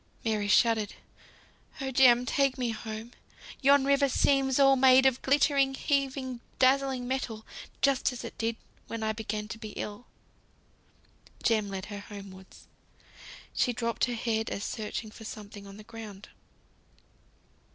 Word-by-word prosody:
Mary 215 -2 0
shuddered. 220 0 +3 0.8
"Oh, 270 -1 -3
Jem! 250 -2 +6
take 275 +1 +1
me 250 -2 -1
home. 220 +1 -7 0.5
Yon 280 0 +5
river 280 0 +3
seems 270 0 +2
all 275 -1 +6
made 260 0 +6
of 260 -1 +3
glittering, 275 -1 +3
heaving, 270 -3 -1 0.2
dazzling 265 -1 +2
metal, 240 -4 -3 0.4
just 275 -1 +3
as 250 - -7
it - - -7
did 230 0 0 0.3
when 230 -1 -5
I 220 0 0
began 215 -1 -4
to 225 - -7
be 215 -2 -8
ill." 210 +4 -6 1.4
Jem 215 -3 +2
led 190 0 -5
her 205 - -5
homewards. 195 -2 -12 0.9
She 245 - +1
dropped 235 0 0
her 245 -1 -3
head 225 -1 -1
as 200 - -4
searching 215 0 -4
for 220 - -12
something 205 -2 -9
on 195 0 -11
the 215 - -11
ground. 210 -3 -10
235 Hz, 140 wpm, -29 LUFS, 215-265 Hz, 1.4 s, Jem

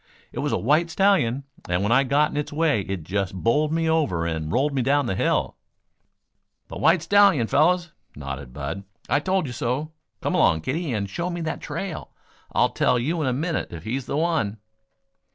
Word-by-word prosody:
"It - - -6
was - - -1
a - - +1
white 155 +8 +2
stallion, 160 -9 +2 0.3
and 90 +2 +1
when 105 - 0
I 135 +3 +5
got 145 +3 +2
in - - -5
its 150 - -2
way 150 -7 +2
it 95 -3 -5
just 95 +2 -2
bowled 145 +10 +1
me 165 0 0
over 145 - +1
and 80 -2 -3
rolled 140 +4 +1
me 135 - +1
down 140 +3 +2
the 95 - -1
hill - - 0 0.6
" - - -53
"The - - -7
white 170 -1 +4
stallion, 200 - +5
fellows," 175 +6 +2 0.2
nodded 70 -2 -7
Bud. 75 +9 -5 0.2
"I 140 - +2
told 185 +2 0
you 125 - -5
so. 130 +6 -2 0.3
Come - - -2
along, 80 0 +3
kiddie, 150 - -2
and 105 -4 -1
show 170 - -3
me 175 -1 -4
that 160 0 -3
trail. 165 +3 -5 0.4
I'll - - +3
tell 125 - +2
you 155 +8 -1
in 145 - 0
a - - +2
minute 155 +6 -2
if 85 -2 -8
he's 125 +5 -3
the - - -2
one." 155 -11 0
140 Hz, 205 wpm, -24 LUFS, 100-160 Hz, 0.6 s, I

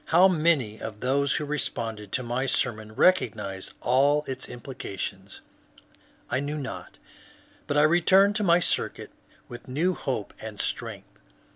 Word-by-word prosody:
How 175 +4 +6
many 155 - +1
of 105 -2 -6
those 140 +2 +2
who 150 - -1
responded 115 -8 -3
to 130 - 0
my 125 +2 -1
sermoiv 110 -5 -1
recognized 100 - +1
all 140 +4 +3
its 130 -1 -5
implications 100 -6 -7 0.9
I 130 - 0
knew 145 +2 -3
not, 140 - -7 0.7
but 145 0 0
I 150 - +6
returned 190 +5 +5
to 210 - -1
my 170 -3 +5
circuit 175 - -1 0.4
with 120 - -10
new 160 +8 +1
hope 130 - -4
and 110 -2 -8
strength. - - -4
130 Hz, 140 wpm, -26 LUFS, 110-155 Hz, 0.9 s, How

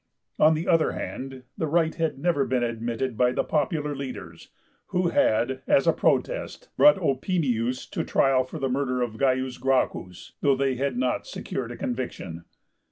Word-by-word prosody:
On 155 +1 +6
the 160 +3 -3
other 165 -2 +3
hand, 130 -1 -6
the 160 - -2
right 160 +1 +2
had 165 -3 -1
never 145 -1 +1
been 125 -1 0
admitted 115 +1 -2
by 125 +2 +2
the - - 0
popular 150 -1 -1
leaders, 110 -12 -8 0.4
who 180 -2 +1
had, 130 -1 +2
as 135 - +4
a 165 - +4
protest, - - -1
brought 295 - +7
Opimius 135 - 0
to - - -2
trial 135 -1 +3
for 130 - -8
the 135 -3 -1
murder 130 -1 0
of 120 - -2
C. 130 -1 +1
Gracchus, 130 -8 -1
though 140 -1 +4
they 135 0 +1
had 130 0 -2
not 125 0 -1
secured 120 -3 -5
a 120 - -7
conviction. 100 -9 -5
130 Hz, 165 wpm, -26 LUFS, 125-155 Hz, 0.4 s, brought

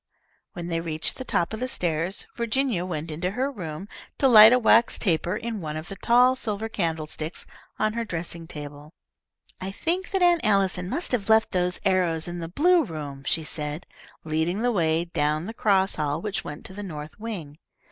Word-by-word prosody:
When 175 -3 -6
they 165 -1 -1
reached 160 -1 -1
the 260 - -5
top 175 -6 -1
of 220 - -4
the 255 - -1
stairs, 175 -4 -2
Virginia 235 -5 0
went 160 -2 -4
into 170 +4 -2
her 270 +2 0
room 180 - -6 0.3
to 275 - +4
light 220 -3 +10
a 250 - +6
wax 230 -1 +4
taper 175 -1 0
in 225 -1 -4
one 155 -1 -4
of 155 +2 -7
the 195 - -6
tall 245 +5 +4
silver 220 -3 -3
candlesticks 160 -5 -3 0.3
on 215 0 +1
her 235 0 -2
dressing 170 -4 -5
table. 145 -1 -8 0.7
"I 190 - -4
think 345 - -2
that 385 -2 +1
Aunt 345 -2 +5
Allison 195 -3 +2
must 330 - -1
have 220 -5 -1
left 220 0 +4
those 180 0 0
arrows 180 -4 +2
in 175 0 -5
the 165 -1 -5
blue 340 - +4
room," 150 - -6
she 165 - +1
said, 150 +1 -4 0.4
leading 160 +7 -1
the 245 - +3
way 165 -4 +1
down 155 -1 0
the 220 - -6
cross 195 -4 +2
hall 150 0 -1
which 205 +2 -3
went 150 +1 -8
to 190 - -8
the 205 - -7
north 155 -3 -8
wing. 175 -10 -6
180 Hz, 195 wpm, -25 LUFS, 160-225 Hz, 0.7 s, light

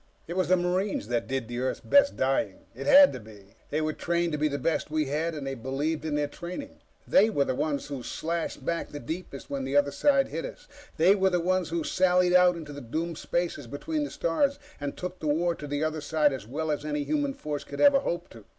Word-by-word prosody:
It 170 - -5
was 185 -3 +1
the 185 +2 +4
Marines 180 - -1
that 120 -1 -1
did 125 -3 -3
Earth's 130 +2 -1
best 280 0 +4
dying. 130 -7 0
It 135 +4 -7
had 280 0 +8
to - - -6
be. 105 -3 -15 0.2
They 155 - 0
were 155 0 -1
trained 170 +1 0
to 150 - -1
be 155 - +3
the 140 -1 -2
best 155 +3 -1
we 155 0 0
had, 155 +4 -1
and 145 -2 -5
they 135 - -3
believed 135 +6 -2
in 155 -2 -1
their 150 0 +1
training. 175 - -8 0.3
They 215 +3 +5
were 145 -10 +1
the - - 0
ones 145 +2 -1
who 140 -3 -5
slashed 165 0 -4
back 170 0 -2
the 145 - -7
deepest 145 0 -7
when 140 -1 -2
the 135 +2 0
other 145 0 +3
side 275 - +3
hit - - -4
us. - - -9 0.3
They 175 +5 +6
were 190 -1 +3
the 180 -1 +1
ones 180 0 0
who 165 -1 -1
sallied 180 +1 +3
out 180 -1 +6
into 150 -3 -8
the 145 - -7
doomed 160 +7 -3
spaces 170 -7 -2
between 295 - -3
the 290 - -3
stars 275 - 0 0.2
and 145 -1 -4
took 180 0 -5
the 155 - -4
war 170 +4 +2
to 150 -3 -8
the 145 +1 -1
other 155 0 -1
side 150 -1 +2
as 130 -6 -6
well 155 +5 -2
as 150 - -2
any 150 -1 -2
human 290 - -1
force 150 - -4
could 140 - -8
ever 285 -1 +6
hope 175 -10 -3
to. 110 -3 -14
155 Hz, 240 wpm, -28 LUFS, 140-180 Hz, 0.3 s, had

